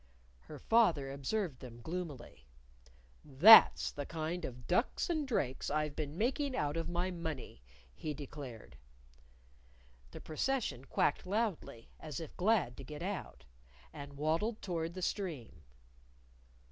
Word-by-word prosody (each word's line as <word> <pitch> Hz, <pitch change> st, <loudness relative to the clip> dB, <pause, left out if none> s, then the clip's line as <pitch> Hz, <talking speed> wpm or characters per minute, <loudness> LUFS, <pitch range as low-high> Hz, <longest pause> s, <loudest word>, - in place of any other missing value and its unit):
Her 150 Hz, -, -11 dB
father 165 Hz, -, +3 dB
observed 140 Hz, +1 st, -2 dB
them 120 Hz, -2 st, -10 dB
gloomily. 150 Hz, -, -7 dB, 0.8 s
"That's 150 Hz, +11 st, +8 dB
the 145 Hz, -2 st, -6 dB
kind 165 Hz, +2 st, -3 dB
of 125 Hz, -1 st, -8 dB
ducks 235 Hz, -, 0 dB
and 310 Hz, -4 st, -1 dB
drakes 135 Hz, -, -1 dB
I've 150 Hz, -1 st, -1 dB
been 155 Hz, 0 st, -4 dB
making 265 Hz, +5 st, 0 dB
out 145 Hz, 0 st, -1 dB
of 165 Hz, 0 st, -2 dB
my 175 Hz, +2 st, -1 dB
money," 160 Hz, -, -6 dB, 0.3 s
he 150 Hz, -, -5 dB
declared. 135 Hz, -, -9 dB, 1.3 s
The -, -, -9 dB
procession 155 Hz, -, -2 dB
quacked 150 Hz, +5 st, 0 dB
loudly, 200 Hz, -, -2 dB
as 155 Hz, -4 st, -6 dB
if 160 Hz, -, -8 dB
glad 185 Hz, -, +1 dB
to -, -, -8 dB
get 150 Hz, +2 st, -8 dB
out. 185 Hz, -, -5 dB, 0.5 s
And 145 Hz, -1 st, -8 dB
waddled 165 Hz, +10 st, 0 dB
toward 170 Hz, -2 st, -3 dB
the 185 Hz, -, -5 dB
stream. 155 Hz, -, -4 dB
155 Hz, 130 wpm, -34 LUFS, 140-185 Hz, 1.3 s, That's